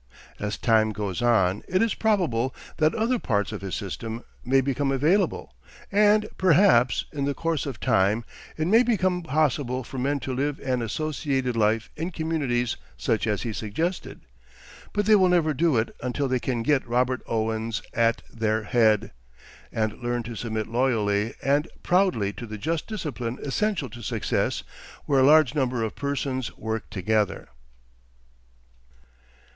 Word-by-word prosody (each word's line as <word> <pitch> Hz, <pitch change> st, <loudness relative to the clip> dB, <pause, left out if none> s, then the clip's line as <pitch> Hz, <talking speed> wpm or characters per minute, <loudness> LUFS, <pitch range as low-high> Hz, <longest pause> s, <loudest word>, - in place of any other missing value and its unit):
As 105 Hz, 0 st, -3 dB
time 110 Hz, -2 st, +3 dB
goes 105 Hz, 0 st, -3 dB
on 105 Hz, -5 st, +3 dB
it 185 Hz, -, +1 dB
is 225 Hz, 0 st, +2 dB
probable 160 Hz, -, +1 dB, 0.2 s
that 155 Hz, -1 st, +2 dB
other 230 Hz, +3 st, +1 dB
parts 105 Hz, -, 0 dB
of -, -, -6 dB
his 95 Hz, -4 st, -4 dB
system, 110 Hz, +5 st, -5 dB, 0.2 s
may 135 Hz, +2 st, +3 dB
become 135 Hz, +1 st, 0 dB
available; 160 Hz, +9 st, +1 dB, 0.4 s
and, 210 Hz, +1 st, +4 dB
perhaps, 165 Hz, -, +4 dB
in 140 Hz, -2 st, -1 dB
the 140 Hz, 0 st, -1 dB
course 165 Hz, -3 st, -1 dB
of 135 Hz, -5 st, -5 dB
time, 105 Hz, +5 st, +2 dB, 0.3 s
it 155 Hz, -, 0 dB
may 220 Hz, +7 st, +5 dB
become 185 Hz, -7 st, +1 dB
possible 145 Hz, -4 st, 0 dB
for 130 Hz, +2 st, -7 dB
men 140 Hz, +3 st, 0 dB
to 130 Hz, -, -3 dB
live 140 Hz, +2 st, -1 dB
an 130 Hz, -2 st, -1 dB
associated 135 Hz, +1 st, -2 dB
life 110 Hz, 0 st, +1 dB
in 165 Hz, +3 st, -3 dB
communities 145 Hz, -8 st, -1 dB, 0.2 s
such 115 Hz, -2 st, 0 dB
as 105 Hz, -2 st, 0 dB
he 115 Hz, -3 st, -3 dB
suggested. 160 Hz, -, -3 dB, 0.7 s
But 205 Hz, 0 st, 0 dB
they 215 Hz, -, +5 dB
will 185 Hz, -3 st, +4 dB
never 165 Hz, -3 st, +3 dB
do 160 Hz, -2 st, +2 dB
it 110 Hz, -, -1 dB
until 130 Hz, +3 st, -1 dB
they 130 Hz, -1 st, 0 dB
can 120 Hz, -2 st, -2 dB
get 135 Hz, 0 st, +1 dB
Robert 125 Hz, +1 st, +1 dB
Owens 110 Hz, 0 st, -2 dB
at 115 Hz, 0 st, +2 dB
their 110 Hz, -1 st, 0 dB
head, 110 Hz, -2 st, +2 dB, 0.6 s
and 110 Hz, -1 st, -2 dB
learn 120 Hz, 0 st, -1 dB
to 115 Hz, +1 st, -7 dB
submit 110 Hz, -1 st, -3 dB
loyally 110 Hz, -3 st, 0 dB
and 145 Hz, +3 st, +2 dB, 0.2 s
proudly 175 Hz, -, +2 dB
to 120 Hz, -, -8 dB
the 110 Hz, 0 st, -6 dB
just 160 Hz, +9 st, -2 dB
discipline 135 Hz, -, -4 dB
essential 185 Hz, +2 st, -1 dB
to 120 Hz, -, -10 dB
success 105 Hz, -, -1 dB, 0.4 s
where 140 Hz, -2 st, +3 dB
a -, -, +5 dB
large 150 Hz, -2 st, +6 dB
number 130 Hz, -5 st, 0 dB
of 110 Hz, -, -3 dB
persons 140 Hz, -3 st, -3 dB
work 110 Hz, 0 st, -4 dB
together. 105 Hz, +2 st, -1 dB
130 Hz, 155 wpm, -25 LUFS, 110-155 Hz, 0.7 s, large